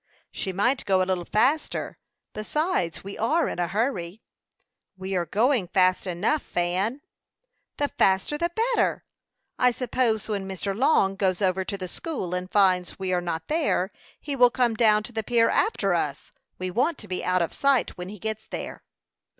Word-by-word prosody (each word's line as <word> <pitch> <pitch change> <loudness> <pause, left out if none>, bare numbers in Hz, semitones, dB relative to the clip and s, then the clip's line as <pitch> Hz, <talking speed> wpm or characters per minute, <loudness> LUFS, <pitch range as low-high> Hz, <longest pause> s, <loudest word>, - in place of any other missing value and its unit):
"She 190 - -3
might 245 +8 +1
go 190 -1 +3
a - - -1
little 185 -2 -1
faster; 275 +8 0 0.3
besides, 215 - -1
we 200 +1 -8
are 310 +10 +2
in - - -4
a 175 - +1
hurry." 200 -2 -2 0.7
"We 190 +1 -4
are 175 -2 0
going 230 -2 +2
fast 185 +1 +2
enough, 200 - 0
Fan." 185 +9 -1 0.8
"The 290 - +1
faster 190 +9 +3
the 340 +3 0 0.2
better! - - +1 0.5
I 250 - +5
suppose, 240 -3 0
when 200 -3 -3
Mr. 195 +1 -3
Long 205 -6 +3
goes 190 -2 0
over 190 -1 +1
to 200 - -3
the 185 -1 -5
school 190 - -5
and 180 0 -3
finds 185 -3 +2
we 190 -1 -2
are 180 - +1
not 165 -2 -4
there, 300 - 0 0.3
he 285 -2 -4
will 245 -2 +6
come 240 -1 +1
down 215 -2 +4
to 245 - -7
the 220 -1 -2
pier 230 +1 +3
after 435 - +1
us. - - -2 0.3
We 185 0 -4
want 265 - +1
to 210 - -11
be 185 - -3
out 180 -1 +2
of 165 - -4
sight 275 -3 +2
when 180 0 -7
he 210 - -8
gets 220 +1 -5
there." - - -6
200 Hz, 180 wpm, -25 LUFS, 185-245 Hz, 0.8 s, will